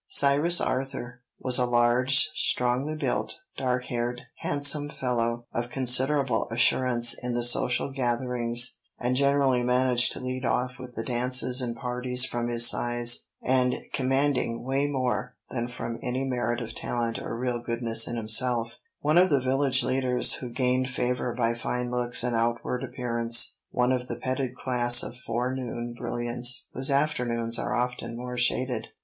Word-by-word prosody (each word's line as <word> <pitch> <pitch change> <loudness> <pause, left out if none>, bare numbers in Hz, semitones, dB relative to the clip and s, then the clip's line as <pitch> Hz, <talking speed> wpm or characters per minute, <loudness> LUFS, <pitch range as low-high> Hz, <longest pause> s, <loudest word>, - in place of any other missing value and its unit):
Cyrus 145 +5 +4
Arthur 130 -2 -4 0.2
was 130 -1 +2
a 125 - +1
large, 120 +2 +4
strongly 135 +1 0
built, 155 - -1 0.2
dark 125 -1 -2
haired, 120 +1 -3 0.2
handsome 145 +1 +2
fellow, 120 -3 -2
of 120 +1 -3
considerable 130 0 +2
assurance 120 0 +3
in 125 -1 -4
the 120 - -1
social 125 +2 +2
gatherings, 120 -1 -1 0.2
and 125 +1 -1
generally 140 -2 +2
managed 125 0 +3
to - - -7
lead 130 0 -5
off 125 0 -1
with 125 -1 -10
the 115 - -4
dances 125 +1 +2
and 120 -2 -3
parties 125 +1 +1
from 120 -1 -3
his 120 0 +5
size 120 0 +2 0.2
and 125 -1 +1 0.2
commanding 135 -3 0
way 135 +3 0
more 125 -2 -2 0.2
than 120 -2 -3
from 120 -1 -6
any 130 +2 -3
merit 120 -2 -2
of 115 - -6
talent 115 -1 -3
or 115 - -5
real 125 0 -2
goodness 115 -1 0
in 120 - -4
himself; 115 +1 +1 0.2
one 155 +4 +3
of 185 +1 +4
the 140 -3 +3
village 130 +1 +2
leaders 130 -1 +2
who 125 - -5
gained 130 +1 0
favor 125 -1 -2
by 115 -1 0
fine 125 +1 -4
looks 120 -1 +1
and 125 -1 -1
outward 120 +2 -1
appearance; 120 -2 0
one 125 0 +1
of 125 -1 -2
the - - -4
petted 130 -1 -3
class 120 -2 +4
of 120 - -7
forenoon 120 -1 -3
brilliants 120 +1 -2
whose 130 +1 -1
afternoons 120 -5 0
are - - -2
often 125 -1 -3
more 125 0 -6
shaded. 125 -1 0
125 Hz, 155 wpm, -26 LUFS, 120-130 Hz, 0.2 s, his